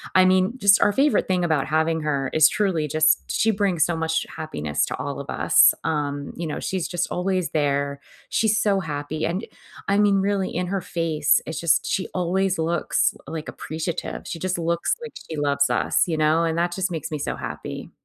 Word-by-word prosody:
I 185 Hz, -, +7 dB
mean, 185 Hz, +4 st, +3 dB
just 200 Hz, 0 st, +5 dB
our 205 Hz, -, +4 dB
favorite 285 Hz, +5 st, +2 dB
thing 180 Hz, -2 st, +1 dB
about 155 Hz, -4 st, 0 dB
having 160 Hz, +1 st, +1 dB
her 140 Hz, -2 st, 0 dB
is 155 Hz, 0 st, +7 dB
truly 180 Hz, -7 st, 0 dB
just 155 Hz, +1 st, +3 dB
she 225 Hz, -, +2 dB
brings 195 Hz, -6 st, +1 dB
so 170 Hz, -2 st, -2 dB
much 160 Hz, 0 st, -1 dB
happiness 75 Hz, -, -2 dB
to -, -, -4 dB
all -, -, -4 dB
of -, -, -8 dB
us. -, -, +5 dB
Um, 145 Hz, -2 st, -2 dB
you 170 Hz, -1 st, -3 dB
know, 150 Hz, -, -4 dB
she's 185 Hz, -3 st, -2 dB
just 175 Hz, 0 st, -2 dB
always 185 Hz, -1 st, -1 dB
there. 140 Hz, -1 st, 0 dB, 0.3 s
She's 220 Hz, -1 st, +2 dB
so 200 Hz, -2 st, +2 dB
happy 155 Hz, -1 st, -4 dB
and 180 Hz, +7 st, -2 dB, 0.4 s
I 200 Hz, -, +3 dB
mean, 205 Hz, -1 st, +4 dB
really, 195 Hz, -1 st, 0 dB
in 180 Hz, 0 st, -1 dB
her 195 Hz, +1 st, -1 dB
face, 160 Hz, -3 st, +1 dB
it's 160 Hz, -, -4 dB
just 165 Hz, 0 st, +2 dB
she 190 Hz, -, -1 dB
always 185 Hz, +1 st, 0 dB
looks, 165 Hz, +1 st, +1 dB
l -, -, -7 dB
like, 155 Hz, -1 st, -5 dB
appreciative. 160 Hz, +1 st, -5 dB
She 165 Hz, -, -5 dB
just 185 Hz, +1 st, -2 dB
looks 170 Hz, -, 0 dB
like 470 Hz, -, -7 dB, 0.2 s
she 160 Hz, -, -4 dB
loves 140 Hz, -1 st, +1 dB
us, -, -, +1 dB
you 165 Hz, -, -1 dB
know, 155 Hz, +2 st, +3 dB
and 165 Hz, 0 st, -1 dB
that 175 Hz, +1 st, +1 dB
just 190 Hz, 0 st, -1 dB
makes 160 Hz, -3 st, -4 dB
me 150 Hz, -, -3 dB
so -, -, -3 dB
happy. -, -, -6 dB
165 Hz, 205 wpm, -23 LUFS, 155-185 Hz, 0.4 s, I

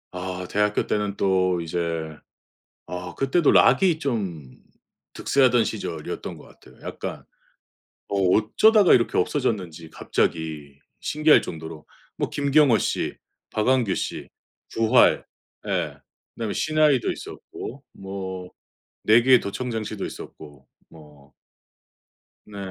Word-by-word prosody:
아 90 Hz, 0 st, -5 dB
대학교 105 Hz, 0 st, +1 dB
때는 105 Hz, -1 st, -1 dB
또 95 Hz, -3 st, +1 dB
이제 80 Hz, -2 st, -3 dB, 0.7 s
아 90 Hz, 0 st, -6 dB
그때도 140 Hz, +4 st, +2 dB
락이 180 Hz, -5 st, +5 dB
좀 95 Hz, -, -4 dB, 0.6 s
득세하던 125 Hz, -4 st, +3 dB
시절이었던 85 Hz, -9 st, -5 dB
것 -, -, -14 dB
같아요 -, -, -19 dB
약간. -, -, -6 dB, 0.9 s
어 -, -, -2 dB
어쩌다가 115 Hz, -, +4 dB
이렇게 115 Hz, -, +2 dB
없어졌는지 90 Hz, -, -1 dB
갑자기 75 Hz, -3 st, -2 dB, 0.2 s
신기할 155 Hz, 0 st, +4 dB
정도로 80 Hz, -1 st, -8 dB, 0.3 s
뭐 -, -, -1 dB
김경호 140 Hz, -3 st, +3 dB
씨, -, -, -2 dB, 0.3 s
박완규 115 Hz, -2 st, +1 dB
씨, -, -, -4 dB, 0.5 s
부활, 115 Hz, +2 st, +4 dB, 0.4 s
예 -, -, -2 dB, 0.4 s
그다음에 110 Hz, -3 st, -3 dB
시나위도 155 Hz, -5 st, +2 dB
있었고 135 Hz, +4 st, -9 dB
뭐 95 Hz, -2 st, -7 dB, 0.6 s
내 110 Hz, +2 st, +6 dB
귀에 125 Hz, 0 st, +5 dB
도청장치도 110 Hz, -1 st, -4 dB
있었고 70 Hz, -2 st, -11 dB, 0.2 s
뭐 75 Hz, -3 st, -17 dB, 1.1 s
네. 105 Hz, -1 st, -12 dB
100 Hz, 240 characters per minute, -24 LUFS, 85-125 Hz, 1.1 s, 내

